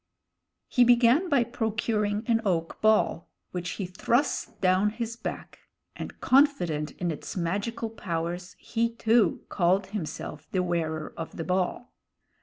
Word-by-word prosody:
He 250 - +4
began 245 +8 +5
by 280 -6 +4
procuring 220 -2 -1
an 225 -1 +2
oak 170 -5 -1
ball, 215 -6 +2 0.2
which 180 -1 -3
he 195 - -4
thrust 240 +9 0
down 190 +1 +3
his 230 +1 -4
back, - - -6 0.4
and, - - -7
confident 180 - +3
in 175 -2 -2
its 155 - -6
magical 200 +6 -2
powers, 175 -3 -4
he, 230 0 -1
too, 225 0 +2
called 190 +1 +2
himself 155 -5 -5
The 185 -1 +1
Wearer 160 -3 -2
of 165 - -7
the 165 - -2
Ball. 185 +7 -1
205 Hz, 135 wpm, -27 LUFS, 175-230 Hz, 0.4 s, began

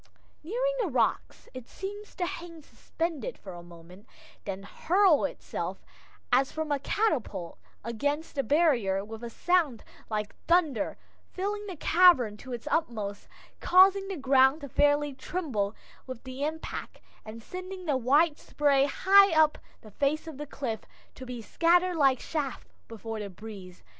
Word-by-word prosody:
Nearing - - -1
the 425 - 0
rocks, 255 -6 -1
it 255 -2 -9
seems 410 +2 -8
to 360 - -1
hang 335 -2 -7
suspended 335 - -4
for 190 - -10
a 175 - -9
moment, 175 +3 -15 0.4
then 195 -1 -5
hurls 360 - +3
itself - - -6 0.5
as 270 0 +4
from 315 -1 -4
a 285 - +1
catapult 280 - -1 0.2
against 285 +8 -2
the 280 - 0
barrier 235 - +2
with 220 +2 -9
a 235 - -4
sound 320 -4 +1 0.3
like 210 -1 -3
thunder, 320 - +2 0.4
filling 410 +2 -3
the 375 - -6
cavern 320 - +5
to 255 +4 -11
its 240 -1 -6
utmost, 215 -10 -2 0.3
causing 390 +2 +5
the 385 -2 -4
ground 270 +1 +4
to 280 - -7
fairly 290 +1 +2
tremble 260 - -3 0.3
with 255 -2 -8
the 260 +1 -6
impact, 320 +1 -5 0.2
and 220 +1 -10
sending 370 - -7
the 295 -4 +1
white 290 +5 +3
spray 280 -2 +2
high 395 +7 +5
up 310 -1 +4 0.2
the 215 - -14
face 285 +8 0
of 315 -4 -9
the 295 - -5
cliff, 235 -6 -4 0.3
to 260 - -10
be 245 -2 -6
scattered 350 +6 +2
like 270 -4 +4
chaff 285 -1 -4 0.2
before 225 0 -6
the 205 -1 -5
breeze. 190 -2 -11
285 Hz, 155 wpm, -28 LUFS, 230-345 Hz, 0.5 s, cavern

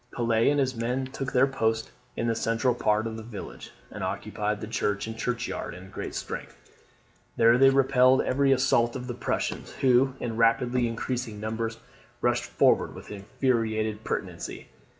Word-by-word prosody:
Pelet 115 -1 +2
and 145 0 +2
his 130 -2 +1
men 125 +3 -1
took 135 0 -5
their 125 +1 +5
post 110 -5 -1 0.2
in 115 - -2
the 115 - +2
central 115 +2 +1
part 110 -2 +1
of 110 -1 -4
the - - -6
village, 110 -3 -9 0.2
and - - -6
occupied 105 0 -2
the 110 - -5
church 105 -2 -1
and 110 0 -6
churchyard 125 -5 -3
in 95 +1 -12
great - - -6
strength. - - -6 0.8
There 115 0 +6
they 135 0 +8
repelled 130 -1 +4
every 135 +1 +2
assault 125 -2 +3
of 125 -1 -5
the 125 - -4
Prussians, 120 - -3
who 130 0 +3
in 115 -2 -4
rapidly 120 +2 +3
increasing 115 -1 -3
numbers 110 +1 -3 0.4
rushed - - +1
forward - - +2
with - - -11
infuriated 110 0 -1
pertinacity. - - -5
115 Hz, 165 wpm, -27 LUFS, 110-130 Hz, 0.8 s, they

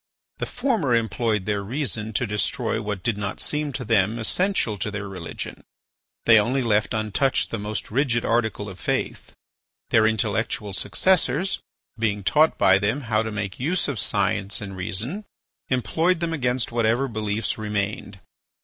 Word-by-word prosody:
The - - -2
former 225 - +1
employed 110 -2 0
their 105 -1 0
reason 110 -1 -2
to 125 - +1
destroy 110 +2 -1
what 105 -3 -4
did 115 -3 0
not 100 -1 -3
seem 150 -1 -1
to 125 0 -3
them, 110 0 +2
essential 120 - 0
to 105 - -1
their 105 -1 -4
religion; 85 -5 -6 0.6
they 115 -2 +8
only 125 +5 +1
left 110 +1 +1
untouched 110 +5 +1
the 115 - -2
most 105 +1 -4
rigid 120 -1 +1
article 110 -3 0
of 95 -3 -9
faith. - - -2 0.6
Their 110 -1 +5
intellectual 110 -1 0
successors, 190 - +2 0.4
being 105 -3 0
taught 155 +9 +4
by 95 +1 +5
them 110 +8 0
how 110 -4 +1
to 110 0 -3
make 105 -3 -4
use 165 +8 0
of 140 -6 -2
science 100 0 0
and 100 -2 -7
reason, 105 - -3 0.5
employed 165 +7 +1
them 170 -1 -1
against 125 -5 0
whatever 120 +3 +2
beliefs 110 -2 -2
remained. 105 -1 -3
110 Hz, 155 wpm, -24 LUFS, 105-130 Hz, 0.6 s, they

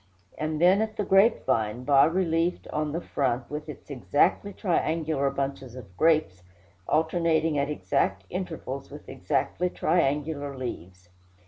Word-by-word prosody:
and 155 0 -3
then 185 +4 +5
at 220 -1 -3
the 210 - 0
grapevine, 130 - +2
bas 140 +3 +5
relieved 170 -1 0
on 150 0 -2
the 165 - -2
front, 125 -6 -1
with 150 +1 -5
its 150 - -10
exactly 145 +9 +1
triangular 160 -6 0
bunches 135 -2 -4
of 105 -8 -11
grapes, 155 - +2 0.5
alternating 160 0 +1
at 140 +1 0
exact 95 -6 -1
intervals 160 -7 -5
with 145 +1 -11
exactly 140 +6 -1
triangular 145 -4 0
leaves. 90 -8 -7
150 Hz, 130 wpm, -27 LUFS, 130-165 Hz, 0.5 s, then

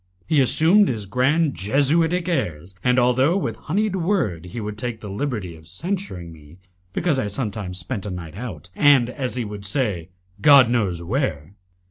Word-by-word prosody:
He 155 -3 +3
assumed 170 +10 +5
his 110 -4 -3
grand 135 - +1
jesuitic 155 - +1
airs, 90 - -2
and, 125 0 +3
although 130 +7 +3
with 115 - -2
honeyed 200 +4 -1
word 165 - -1
he 90 +6 -7
would 105 -1 -5
take 120 0 -4
the 105 -3 -8
liberty 105 - -3
of 80 0 -16
censuring 95 - -5
me 75 +1 -16 0.3
because 155 - 0
I 105 - -1
sometimes 105 -4 -4
spent 95 +3 -4
a - - -3
night 85 -4 -7
out, 90 - -8
and, 135 -5 +4
as 130 -2 -4
he 125 -2 -2
would 105 -1 -7
say, 100 - -1 0.3
"God 140 -5 +7
knows 95 -8 0
where!" 90 - -2
120 Hz, 170 wpm, -22 LUFS, 95-145 Hz, 0.3 s, God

